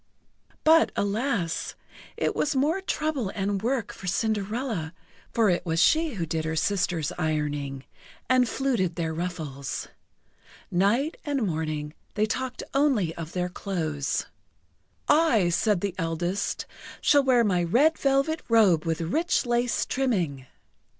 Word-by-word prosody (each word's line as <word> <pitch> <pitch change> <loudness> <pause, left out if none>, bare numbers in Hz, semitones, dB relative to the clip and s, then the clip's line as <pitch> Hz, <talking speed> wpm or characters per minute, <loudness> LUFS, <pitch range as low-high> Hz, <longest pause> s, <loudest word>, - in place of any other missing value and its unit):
But, 320 +1 +5
alas! 205 -4 -1 0.4
it - - 0
was 300 -1 0
more 300 +8 +1
trouble 300 - -1
and 195 -1 -1
work 240 0 -1
for 195 - -9
Cinderella, 210 -3 -1 0.4
for 225 -4 +3
it 175 - 0
was 165 -1 -1
she 315 - +3
who 175 -4 -2
did 160 0 -2
her 160 0 -2
sisters' 175 -3 0
ironing, 145 -4 -2 0.4
and 255 -2 +3
fluted 235 -11 0
their 165 -2 -2
ruffles. 155 -5 -4 0.8
Night 220 - +2
and 280 -6 0
morning, 155 -3 -3 0.2
they 210 - +2
talked 250 +3 -3
only 260 - +2
of 165 -1 -7
their 180 -1 -1
clothes. 160 -7 -2 0.8
"I," 280 - +4
said 175 +2 +1
the 200 -3 -1
eldest, 175 +4 -2 0.3
"shall 285 - +5
wear 250 -3 +4
my 180 -5 +2
red 270 - +4
velvet 275 +3 +1
robe 200 -8 +4
with 165 0 -1
rich 310 - +1
lace 240 0 +1
trimming." 175 - -1
200 Hz, 130 wpm, -26 LUFS, 165-255 Hz, 0.8 s, But